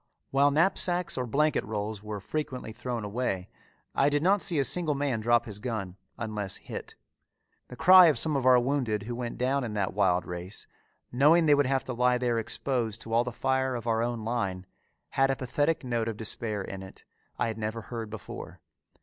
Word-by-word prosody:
While 140 Hz, +1 st, +4 dB
knapsacks 175 Hz, +2 st, +1 dB
or 125 Hz, -1 st, -2 dB
blanket 150 Hz, +5 st, +1 dB
rolls 105 Hz, 0 st, -4 dB
were 105 Hz, -1 st, -5 dB
frequently 130 Hz, +1 st, -4 dB
thrown 120 Hz, 0 st, -4 dB
away, 100 Hz, -3 st, -2 dB, 0.4 s
I 140 Hz, -, +3 dB
did 145 Hz, +1 st, 0 dB
not 195 Hz, +2 st, +3 dB
see 175 Hz, -5 st, +2 dB
a 140 Hz, -, +3 dB
single 155 Hz, +2 st, +1 dB
man 140 Hz, -4 st, -1 dB
drop 120 Hz, +2 st, +2 dB
his 105 Hz, -2 st, -6 dB
gun 105 Hz, -6 st, -4 dB, 0.2 s
unless 105 Hz, -4 st, -3 dB
hit. -, -, -8 dB, 0.7 s
The 125 Hz, -, -10 dB
cry 180 Hz, +5 st, +8 dB
of 155 Hz, -, +3 dB
some 155 Hz, -2 st, +2 dB
of 135 Hz, -, 0 dB
our 130 Hz, -1 st, +7 dB
wounded 120 Hz, -5 st, -1 dB
who 120 Hz, +3 st, -5 dB
went 120 Hz, -1 st, -5 dB
down 130 Hz, +3 st, 0 dB
in 110 Hz, -3 st, -4 dB
that 100 Hz, -2 st, -1 dB
wild 95 Hz, -3 st, +2 dB
race, 90 Hz, +3 st, -7 dB, 0.5 s
knowing 150 Hz, +7 st, +5 dB
they 150 Hz, -, +6 dB
would 145 Hz, -2 st, +3 dB
have 135 Hz, -1 st, +1 dB
to 130 Hz, -, -5 dB
lie 125 Hz, +1 st, +2 dB
there 120 Hz, -2 st, 0 dB
exposed 115 Hz, 0 st, -1 dB
to 115 Hz, -, -6 dB
all 115 Hz, +1 st, +4 dB
the 125 Hz, -, -4 dB
fire 130 Hz, +1 st, 0 dB
of 115 Hz, -2 st, -5 dB
our 115 Hz, -1 st, +1 dB
own 120 Hz, -2 st, -2 dB
line, 100 Hz, -6 st, -2 dB, 0.4 s
had 135 Hz, 0 st, +2 dB
a 135 Hz, -, +1 dB
pathetic 145 Hz, +5 st, -1 dB
note 120 Hz, -3 st, -1 dB
of 110 Hz, -2 st, -3 dB
despair 110 Hz, -2 st, -3 dB
in 95 Hz, 0 st, -7 dB
it, 95 Hz, 0 st, -12 dB, 0.3 s
I -, -, +1 dB
had 110 Hz, 0 st, -5 dB
never 110 Hz, +1 st, -3 dB
heard 115 Hz, -2 st, -6 dB
before. 105 Hz, -3 st, -8 dB
120 Hz, 200 wpm, -28 LUFS, 110-140 Hz, 0.7 s, cry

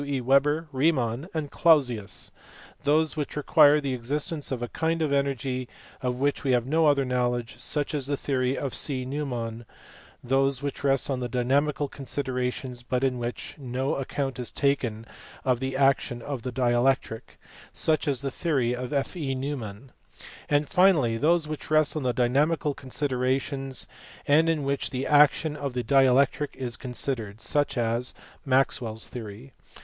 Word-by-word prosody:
E. 140 Hz, -1 st, -2 dB
Weber, 140 Hz, +5 st, +2 dB
Riemann, 135 Hz, 0 st, 0 dB
and 155 Hz, -3 st, -4 dB
Clausius); 125 Hz, -11 st, +2 dB, 0.5 s
those 155 Hz, +2 st, +2 dB
which 150 Hz, -2 st, -4 dB
require 150 Hz, 0 st, +5 dB
the 140 Hz, -3 st, -2 dB
existence 145 Hz, +6 st, -3 dB
of 125 Hz, -2 st, -2 dB
a -, -, -2 dB
kind 165 Hz, +5 st, -1 dB
of 155 Hz, -3 st, 0 dB
energy 135 Hz, -2 st, -1 dB, 0.3 s
of 125 Hz, -1 st, -1 dB
which 140 Hz, +3 st, 0 dB
we 135 Hz, -2 st, +2 dB
have 120 Hz, -1 st, +2 dB
no 160 Hz, +4 st, +3 dB
other 140 Hz, -2 st, +3 dB
knowledge 125 Hz, -1 st, -1 dB
(such 145 Hz, +5 st, -2 dB
as 140 Hz, -3 st, -2 dB
the 145 Hz, 0 st, -1 dB
theory 130 Hz, -1 st, 0 dB
of 135 Hz, -3 st, -3 dB
C. 130 Hz, -3 st, +1 dB
Neumann); 120 Hz, -5 st, -4 dB, 0.6 s
those 135 Hz, +1 st, +1 dB
which 140 Hz, 0 st, -4 dB
rest 135 Hz, -1 st, +2 dB
on 130 Hz, -, -1 dB
dynamical 140 Hz, +4 st, +1 dB
considerations 130 Hz, -2 st, -3 dB
but 125 Hz, +1 st, -2 dB
in 130 Hz, -2 st, +1 dB
which 125 Hz, +4 st, -5 dB
no 130 Hz, 0 st, -2 dB
account 135 Hz, 0 st, -3 dB
is 125 Hz, -, -4 dB
taken 125 Hz, -6 st, 0 dB, 0.4 s
of 125 Hz, -2 st, +2 dB
the 130 Hz, 0 st, -2 dB
action 135 Hz, -3 st, +2 dB
of 140 Hz, -2 st, -4 dB
the 125 Hz, -, -4 dB
dielectric 120 Hz, -1 st, 0 dB, 0.3 s
(such 155 Hz, 0 st, +2 dB
as 140 Hz, -3 st, 0 dB
the 135 Hz, -1 st, -3 dB
theory 135 Hz, -7 st, 0 dB
of 125 Hz, +1 st, -5 dB
F. 140 Hz, +4 st, -1 dB
E. 140 Hz, -6 st, -2 dB
Neumann); 130 Hz, -4 st, -5 dB, 0.6 s
and 145 Hz, 0 st, +2 dB
finally 180 Hz, -, +4 dB
those 160 Hz, +4 st, +2 dB
which 155 Hz, -1 st, -6 dB
rest 155 Hz, 0 st, +3 dB
on 155 Hz, -, -1 dB
dynamical 145 Hz, +5 st, +2 dB
considerations 135 Hz, 0 st, -2 dB, 0.4 s
and 160 Hz, +3 st, +4 dB
in 160 Hz, -3 st, 0 dB
which 140 Hz, 0 st, -1 dB
the 130 Hz, +1 st, -3 dB
action 150 Hz, +1 st, +4 dB
of 140 Hz, -4 st, -4 dB
the 125 Hz, -, -1 dB
dielectric 135 Hz, +2 st, +3 dB
is 125 Hz, -3 st, -3 dB
considered 120 Hz, -4 st, -4 dB
(such 140 Hz, +5 st, 0 dB
as 120 Hz, +1 st, 0 dB, 0.3 s
Maxwell 130 Hz, -4 st, +1 dB
s 110 Hz, -, -3 dB
theory). 115 Hz, +2 st, -9 dB
135 Hz, 160 wpm, -26 LUFS, 125-145 Hz, 0.6 s, require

